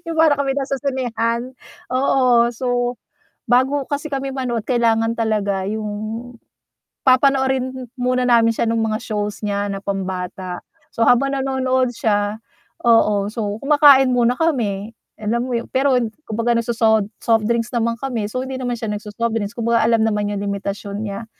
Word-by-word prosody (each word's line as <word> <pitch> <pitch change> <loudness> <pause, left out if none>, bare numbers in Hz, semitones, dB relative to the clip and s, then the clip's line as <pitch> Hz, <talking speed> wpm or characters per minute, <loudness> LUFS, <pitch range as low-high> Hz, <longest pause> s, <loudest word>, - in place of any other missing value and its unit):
yung 335 -2 -6
para 320 -2 +5
kami 275 -1 0
nasa 275 -1 -2
sinehan, 245 -2 -2 0.4
oo. 255 -2 +3
So, 245 0 -1 0.5
bago 260 +3 +2
kasi 290 +1 -4
kami 275 0 -2
manood 240 -4 -3
kailangan 230 -2 +2
talaga 205 -4 0
yung 215 0 -3 1.2
papanoorin 260 -1 +2
muna 250 0 +1
namin 230 -2 +4
siya - - 0
nung 230 0 +1
mga 220 +1 -2
shows 210 -2 -3
niya 205 0 -1
na 195 -1 -4
pambata. 185 -2 -4 0.3
So, 230 - +2
habang 275 +4 +3
nanonood 260 -1 0
siya 205 -1 0 0.5
oo, 210 -3 +4
so 210 -3 -3
kumakain 280 -2 +6
muna 245 0 +2
kami 225 -10 -1 0.3
alam 235 +4 -2
mo 240 - 0
yun, 230 - -4
pero 265 0 +3 0.3
kumbaga 230 +2 0
nagsosod 225 -3 +2
softdrinks 230 +1 0
naman 230 0 0
kami 235 -5 -3
so 255 +3 -3
hindi 265 - -6
naman 245 -1 -2
siya 225 - -5
nagso-softdrinks, 210 +1 -3
kumbaga 230 0 +2
alam 225 -1 +3
naman 210 -2 0
yung 205 - -3
limitasyon 200 0 -4
niya. 200 +1 -5
235 Hz, 150 wpm, -20 LUFS, 215-260 Hz, 1.2 s, kumakain